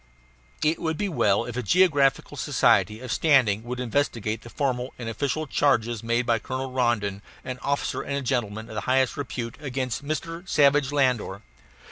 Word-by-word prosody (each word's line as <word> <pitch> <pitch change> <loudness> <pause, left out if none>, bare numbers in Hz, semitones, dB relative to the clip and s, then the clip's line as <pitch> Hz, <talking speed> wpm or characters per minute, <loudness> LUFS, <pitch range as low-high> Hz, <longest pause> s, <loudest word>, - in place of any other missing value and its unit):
It 155 +2 +2
would 160 -2 -2
be 205 - -1
well 110 - +2
if 120 - -6
a 125 - -1
geographical 140 - +3
society 105 +1 +2
of 130 -2 -6
standing 125 -9 +3
would 125 +1 -4
investigate 115 -4 -1
the 120 - -11
formal 130 -2 -2
and 120 - -6
official 140 +7 -2
charges 120 -6 +1
made 115 +1 0
by 115 -1 +2
Colonel 130 +3 -4
Rondon, 115 -6 0 0.2
an 130 -1 -5
officer 140 0 -1
and 140 -1 -3
gentleman 110 -4 -2
of - - -10
the 105 - -3
highest 130 0 +3
repute, 120 -4 -5
against 130 -2 -3
Mr. 165 +4 -4
Savage 145 -1 +4
Landor. 125 -8 0
130 Hz, 165 wpm, -25 LUFS, 115-140 Hz, 0.2 s, Savage